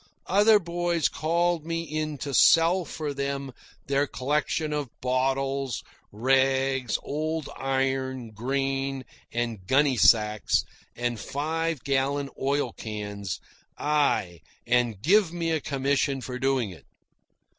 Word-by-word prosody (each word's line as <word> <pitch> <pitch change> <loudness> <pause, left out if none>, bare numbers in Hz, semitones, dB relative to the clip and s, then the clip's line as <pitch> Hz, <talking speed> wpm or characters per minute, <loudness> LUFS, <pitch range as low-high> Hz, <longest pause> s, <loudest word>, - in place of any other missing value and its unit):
Other 210 +3 +5
boys 175 -3 0
called 170 +1 0
me 165 +1 -2
in 155 -1 -3
to 140 - -4
sell 170 +5 +5
for 150 -2 -4
them 140 -1 -3 0.3
their 140 +1 +1
collections 150 +3 -1
of 145 -4 -2
bottles, 135 0 -1 0.3
rags, 130 +1 +2
old 155 +1 -3
iron, 130 -2 -1
grain, 135 +3 -2 0.3
and 115 -5 -3
gunny 135 +1 +3
sacks, 105 -2 +4 0.3
and 120 -1 -2
five 160 -1 -2
gallon 140 +1 0
oil 140 -2 0
cans 105 -3 -5 0.4
aye, 145 - +1 0.3
and 120 -4 +1
gave 190 +1 +4
me 170 -1 -2
a 160 -2 0
commission 140 0 0
for 125 0 -6
doing 130 -5 +1
it. 80 -5 -14
135 Hz, 115 wpm, -26 LUFS, 125-155 Hz, 0.4 s, Other